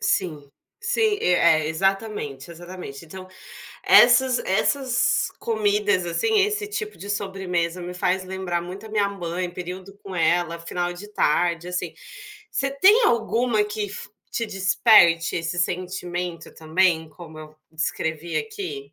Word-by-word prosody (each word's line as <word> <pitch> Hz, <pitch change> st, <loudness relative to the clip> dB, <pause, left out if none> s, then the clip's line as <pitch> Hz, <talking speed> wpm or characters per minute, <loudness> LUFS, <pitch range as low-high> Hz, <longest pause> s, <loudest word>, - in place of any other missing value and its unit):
Sim, 155 Hz, -6 st, -1 dB, 0.3 s
sim, 450 Hz, -3 st, +1 dB
e -, -, -3 dB
é 160 Hz, -3 st, +4 dB
exatamente, 180 Hz, -4 st, -2 dB
exatamente 175 Hz, -3 st, -9 dB
então, 185 Hz, +3 st, -10 dB, 0.6 s
essas 250 Hz, +1 st, +6 dB
essas 250 Hz, +6 st, +1 dB
comidas 205 Hz, -3 st, +1 dB
assim, 425 Hz, -, +1 dB
esse 420 Hz, +1 st, 0 dB
tipo 425 Hz, 0 st, -5 dB
de 200 Hz, -, -9 dB
sobremesa 185 Hz, -4 st, -2 dB
me 180 Hz, +1 st, -6 dB
faz 180 Hz, +1 st, 0 dB
lembrar 185 Hz, -2 st, -3 dB
muito 190 Hz, +5 st, -8 dB
a -, -, -15 dB
minha 210 Hz, -2 st, +1 dB
mãe, 180 Hz, -2 st, -4 dB
período 185 Hz, +2 st, -8 dB
com 190 Hz, -2 st, -7 dB
ela, 170 Hz, 0 st, +1 dB
final 175 Hz, +1 st, -3 dB
de 200 Hz, +4 st, -10 dB
tarde 170 Hz, +2 st, +1 dB
assim, 180 Hz, 0 st, -3 dB, 0.6 s
você 275 Hz, -, 0 dB
tem 385 Hz, -, +5 dB
alguma 230 Hz, -, +1 dB
que 210 Hz, 0 st, -4 dB
fi 205 Hz, -, -7 dB, 0.2 s
te 230 Hz, -, -1 dB
desperte 190 Hz, -4 st, +4 dB
esse 165 Hz, +1 st, -2 dB
sentimento 175 Hz, -1 st, -3 dB
também, 160 Hz, 0 st, +1 dB
como 160 Hz, -2 st, -12 dB
eu 155 Hz, 0 st, -11 dB, 0.2 s
descrevi 160 Hz, +1 st, -2 dB
aqui? 425 Hz, -, -5 dB
185 Hz, 135 wpm, -23 LUFS, 170-215 Hz, 0.6 s, essas